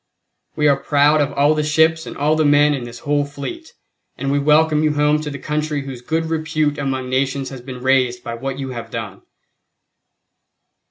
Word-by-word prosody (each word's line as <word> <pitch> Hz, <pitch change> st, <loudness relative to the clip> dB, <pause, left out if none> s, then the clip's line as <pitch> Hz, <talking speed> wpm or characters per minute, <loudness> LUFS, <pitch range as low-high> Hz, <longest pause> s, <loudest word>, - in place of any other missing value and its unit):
We 150 Hz, -1 st, +2 dB
are 140 Hz, -2 st, +4 dB
proud 150 Hz, +1 st, +3 dB
of 145 Hz, -1 st, 0 dB
all 145 Hz, +2 st, +3 dB
the 155 Hz, -, 0 dB
ships 160 Hz, +1 st, +2 dB
and -, -, -8 dB
all 150 Hz, +2 st, +2 dB
the 155 Hz, -, +2 dB
men 145 Hz, 0 st, +4 dB
in 130 Hz, -4 st, -4 dB
this 120 Hz, 0 st, -9 dB
whole 145 Hz, 0 st, +2 dB
fleet, 145 Hz, -, -7 dB, 0.5 s
and 135 Hz, 0 st, -2 dB
we 145 Hz, -, +2 dB
welcome 150 Hz, +1 st, +3 dB
you 155 Hz, -1 st, +2 dB
home 150 Hz, +1 st, +2 dB
to 150 Hz, -, -4 dB
the 140 Hz, -, -6 dB
country 150 Hz, 0 st, -2 dB
whose 130 Hz, -3 st, -8 dB
good 160 Hz, +6 st, -1 dB
repute 155 Hz, -2 st, -1 dB
among 135 Hz, -2 st, -2 dB
nations 135 Hz, +1 st, -1 dB
has 130 Hz, -2 st, -9 dB
been 125 Hz, 0 st, -9 dB
raised 130 Hz, -2 st, +2 dB
by 115 Hz, -, -5 dB
what 135 Hz, +3 st, -4 dB
you 135 Hz, -1 st, -5 dB
have 120 Hz, -2 st, -7 dB
done." -, -, -6 dB
145 Hz, 200 wpm, -19 LUFS, 135-155 Hz, 0.5 s, are